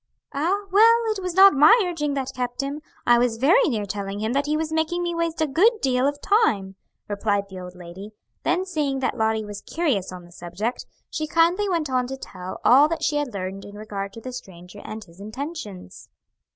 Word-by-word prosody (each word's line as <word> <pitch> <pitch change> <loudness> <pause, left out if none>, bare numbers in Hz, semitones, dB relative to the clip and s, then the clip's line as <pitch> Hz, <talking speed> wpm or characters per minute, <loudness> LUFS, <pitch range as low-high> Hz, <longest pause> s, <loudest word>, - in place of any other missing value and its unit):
"Ah? 355 +9 0
Well 455 +4 +6 0.2
it 390 - -5
was 365 -2 -4
not 390 +1 +8
my 305 - +7
urging 295 -5 -2
that 265 -1 -3
kept 245 0 -2
him; 280 +2 -4 0.2
I 240 0 +5
was 240 -2 +1
very 335 - +4
near 215 -5 -1
telling 200 0 -4
him 220 +3 -1
that 280 +1 0
he 305 +1 +1
was 315 0 -3
making 320 +2 0
me 345 0 -1
waste 335 -1 -2
a - - +4
good 350 - +4
deal 260 -3 +1
of 285 0 -2
time" 215 - +2 0.3
replied 205 -1 -1
the 190 -1 -8
old 180 0 -9
lady; 180 +3 -10 0.3
then 360 +2 0
seeing 300 -7 -1
that 260 - 0
Lottie 220 -2 0
was 205 -1 -7
curious 275 - -1
on 180 -1 -9
the 175 - -17
subject, 175 +8 -5 0.2
she 310 - -3
kindly 340 +6 +2
went 335 -4 0
on 255 -2 0
to 270 +1 -5
tell 185 -7 -8
all 275 +4 +7
that 330 +1 -3
she 295 - +1
had 290 -3 -2
learned 195 -1 -5
in 205 - -11
regard 205 -2 -5
to 230 - -10
the 255 +2 -7
stranger 185 -4 -10
and 215 0 -7
his 170 -1 -19
intentions. 215 - -8
255 Hz, 215 wpm, -24 LUFS, 205-320 Hz, 0.3 s, not